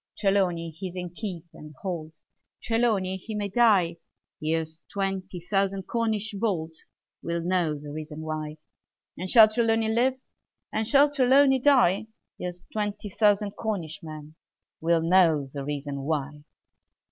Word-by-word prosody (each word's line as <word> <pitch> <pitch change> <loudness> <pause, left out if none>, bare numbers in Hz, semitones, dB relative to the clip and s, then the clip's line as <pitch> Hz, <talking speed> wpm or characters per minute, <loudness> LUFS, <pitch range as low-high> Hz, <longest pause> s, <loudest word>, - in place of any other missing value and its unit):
Trelawny 185 -5 +1
he's 180 +3 -7
in 180 -1 -5
keep 180 -3 -6
and 150 -1 -12
hold; 160 -4 -5 0.4
Trelawny 220 -5 +1
he 215 +3 -7
may 205 -1 -2
die: 195 -6 +3 0.4
Here's 160 +1 -2
twenty 195 -2 -3
thousand 195 +1 0
Cornish 220 0 -1
bold 195 -6 -1 0.5
Will 170 0 -3
know 175 -4 +1
the 145 0 -9
reason 155 0 -7
why 155 -1 -5 0.6
And 185 +2 -5
shall 220 0 +9
Trelawny 225 0 +1
live? 255 +3 +2 0.6
Or 220 - +1
shall 285 +4 +5
Trelawny 270 0 +5
die? 245 -8 +4 0.3
Here's 180 0 -6
twenty 210 -1 -3
thousand 205 0 +2
Cornish 185 -9 -4
men 155 -1 -9 0.5
Will 165 0 +2
know 165 -6 +3
the 140 -1 -4
reason 145 -1 -4
why! 145 0 -3
185 Hz, 135 wpm, -26 LUFS, 160-215 Hz, 0.6 s, shall